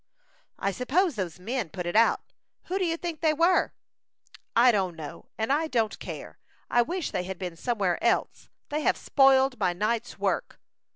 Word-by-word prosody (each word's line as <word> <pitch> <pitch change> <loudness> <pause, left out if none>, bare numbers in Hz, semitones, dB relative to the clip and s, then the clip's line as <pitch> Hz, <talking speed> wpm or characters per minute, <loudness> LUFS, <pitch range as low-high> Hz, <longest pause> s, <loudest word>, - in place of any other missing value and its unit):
"I 200 - 0
suppose 305 - +1
those 185 -7 -4
men 225 0 -3
put 180 +1 -5
it 175 - -3
out. 230 +1 +4 0.4
Who 380 +2 -2
do 370 - +1
you 330 -1 0
think 335 -3 -5
they 310 -2 +3
were?" 340 +4 +3 0.8
"I 240 +2 +7
don't 190 -5 0
know, 155 -3 -9
and 220 +5 +1
I 315 +3 +1
don't 225 -7 0
care. - - -8 0.3
I 240 - +5
wish 345 +6 -2
they 180 - -2
had 190 0 -5
been 180 -2 -5
somewhere 195 -3 -1
else. - - 0 0.2
They 300 +1 -1
have - - +2
spoiled 270 -2 +4
my 180 -3 +2
night's 220 +5 -2
work." - - -2
235 Hz, 180 wpm, -27 LUFS, 190-300 Hz, 0.8 s, I